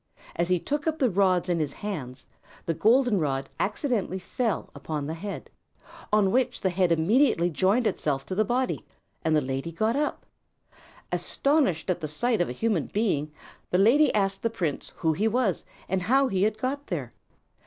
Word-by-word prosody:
As 170 +1 0
he 180 -1 +3
took 290 - -3
up 320 0 0
the 255 -6 +2
rods 185 -2 +2
in 175 -2 +1
his 150 -3 -1
hands, 140 -11 -6 0.4
the 165 - 0
golden 235 - +3
rod 135 -3 -1
accidentally 210 - -1
fell 215 +4 -2
upon 150 -3 -4
the 155 - -3
head, 195 +5 -6 0.6
on 210 -2 +3
which 250 +1 +1
the 190 - +1
head 180 -1 +2
immediately 175 - +3
joined 195 - +2
itself 140 -9 -1
to - - -5
the 215 +3 +2
body, 250 +4 -1 0.4
and 160 -1 +2
the 150 - +3
lady 135 +4 -3
got 220 +8 0
up. 295 +1 -2 0.9
Astonished 275 - +1
at 175 - -3
the 155 - -2
sight 225 +8 0
of 175 - 0
a - - -3
human 200 - 0
being, 170 -9 0 0.4
the 180 - +2
lady 245 +10 +5
asked 195 -2 +1
the 230 - +1
prince 170 -10 -3
who 160 -1 +1
he 205 +8 +1
was 225 -4 0 0.2
and 190 0 0
how 265 +8 +3
he 190 -2 0
had 215 +1 +2
got 275 +5 -3
there. 140 -9 -4
195 Hz, 185 wpm, -26 LUFS, 165-235 Hz, 0.9 s, lady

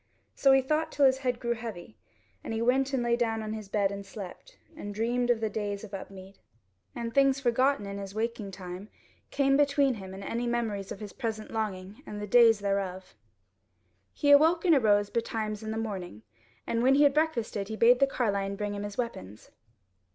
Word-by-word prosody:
So 275 - +4
he 270 0 +5
thought 310 +3 0
till 280 - +3
his 265 0 +4
head 250 -3 -1
grew 235 -1 -1
heavy, 225 -4 -8 0.5
and 225 - -4
he 220 - -2
went 265 +3 +2
and 260 -3 0
lay 235 0 +2
down 225 -2 -1
in 215 0 -4
his 215 -2 -7
bed 200 -1 +1
and 200 0 -6
slept, 200 - -10 0.2
and 205 -10 -7
dreamed 240 +3 0
of 235 -2 +2
the 220 - +1
days 205 -1 -3
of 210 -2 -10
Upmead; 195 0 -9 0.6
and 235 -1 -4
things 275 -1 +4
forgotten 255 -2 +1
in 200 0 -6
his 195 0 -8
waking 225 -2 -3
time 185 +1 -8 0.4
came 275 -1 +2
between 280 -1 +3
him 190 -4 -8
and 195 - -8
any 235 +4 -3
memories 220 -5 -2
of 200 - -7
his 205 -2 -8
present 220 -3 -4
longing 205 -2 -4
and 210 - -6
the 210 - -4
days 225 -1 +5
thereof. 195 -2 -3 1.0
He 285 -2 +1
awoke 320 +5 +5
and 340 - +6
arose 205 -6 +3
betimes 220 -2 -2
in 220 - -6
the 220 - -3
morning, 190 - -5 0.4
and 230 - -1
when 265 +2 +4
he 290 - +5
had 285 -1 +5
breakfasted 240 -10 -1
he 220 - -5
bade 240 +3 +5
the 275 - +4
carline 200 -6 -1
bring 205 0 -3
him 200 - -5
his 205 0 -6
weapons. 105 - -6
225 Hz, 200 wpm, -28 LUFS, 200-250 Hz, 1.0 s, and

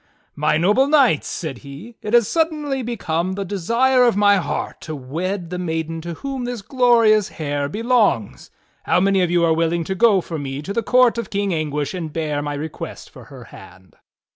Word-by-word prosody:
"My 150 +1 +1
noble 210 - +3
knights," 275 - +3
said 145 -7 -5
he, 145 +12 -11
"it 210 +3 0
has 235 -3 +4
suddenly 305 -5 -1
become 185 -7 -2
the 200 +1 -4
de 200 +2 -4
sire 250 +7 +3
of 235 -4 +3
my 205 -1 +5
heart 185 - -4
to 155 - -6
wed 170 +7 -4
the 180 - -3
maiden 165 -1 -3
to 170 0 -6
whom 270 +4 -5
this 245 -4 -5
glorious 230 -4 +3
hair 145 -2 -3
belongs. 215 - 0 0.4
How - - +3
many 195 0 +2
of 180 - +1
you 175 -1 +2
are 165 - +3
willing 165 +1 0
to 190 - -3
go 210 0 +4
for 165 -3 -5
me 140 0 -5
to 200 - -5
the 230 - 0
court 250 -1 +3
of 230 - -5
King 200 -1 -1
Anguish 150 -1 -2
and 165 -4 -5
bear 150 -2 -2
my 145 0 -4
request 150 +2 -7
for - - -13
her - - -12
hand?" 95 +1 -15
185 Hz, 200 wpm, -20 LUFS, 160-235 Hz, 0.4 s, my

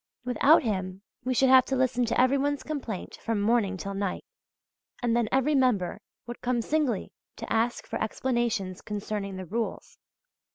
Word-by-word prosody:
Without 270 +5 +5
him 190 -3 -3 0.2
we 255 0 -1
should 265 +2 +4
have 260 -1 +7
to 270 - -1
listen 250 -1 +1
to 230 - 0
every 255 +2 +4
one's 285 +1 0
complaint 265 -11 -5
from 225 -2 -1
morning 205 -2 +2
till 200 +2 -5
night; 195 -1 -3 0.8
and 235 -1 +2
then 235 -3 +1
every 270 +3 +2
member 245 -10 +1 0.2
would 240 0 -8
come 250 -1 0
singly 290 -8 0 0.2
to - - -5
ask 230 +2 0
for - - -4
explanations 220 -5 -1
concerning 205 -1 -4
the 185 0 -6
rules{W}. 225 +6 -4
235 Hz, 165 wpm, -27 LUFS, 200-260 Hz, 0.8 s, have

